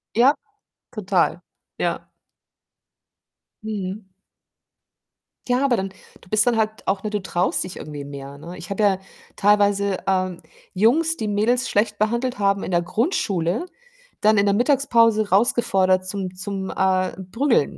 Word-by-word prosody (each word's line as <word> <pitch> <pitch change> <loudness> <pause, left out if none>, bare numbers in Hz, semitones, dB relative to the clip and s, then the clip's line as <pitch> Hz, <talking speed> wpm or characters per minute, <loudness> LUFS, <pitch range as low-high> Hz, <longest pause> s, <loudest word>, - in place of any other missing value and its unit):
Ja, 255 +6 +5 0.6
total. - - +1 0.4
Ja. - - -2 1.6
Mhm. 205 -1 -4 1.5
Ja, 250 +2 +2
aber 260 -3 +3
dann 195 -3 -2 0.3
du - - -19
bist 215 +3 +3
dann 240 - +3
halt 220 -1 -2
auch, 195 +1 0
ne, 215 - -2
du 210 -1 -2
traust 180 -1 0
dich 185 - -8
irgendwie 145 -2 -7
mehr, 140 0 -9
ne? 170 +5 -9
Ich 175 - -9
habe 200 +2 -2
ja 200 -2 +4 0.4
teilweise, 200 -1 +3
ähm, 185 -2 0 0.3
Jungs, 290 - +3
die 220 - -3
Mädels 225 +5 +1
schlecht 210 0 +1
behandelt 235 +3 0
haben, 200 -1 +1
in - - -4
der 175 -1 +2
Grundschule 195 - -1 0.6
dann 215 0 +4
in 200 - +4
der 200 0 +3
Mittagspause 230 -4 +3
rausgefordert 190 -4 +3
zum 185 -1 -4
zum, 190 0 -4
äh, 185 -1 +1
Prügeln, 210 - 0
200 Hz, 140 wpm, -22 LUFS, 185-225 Hz, 1.6 s, Ja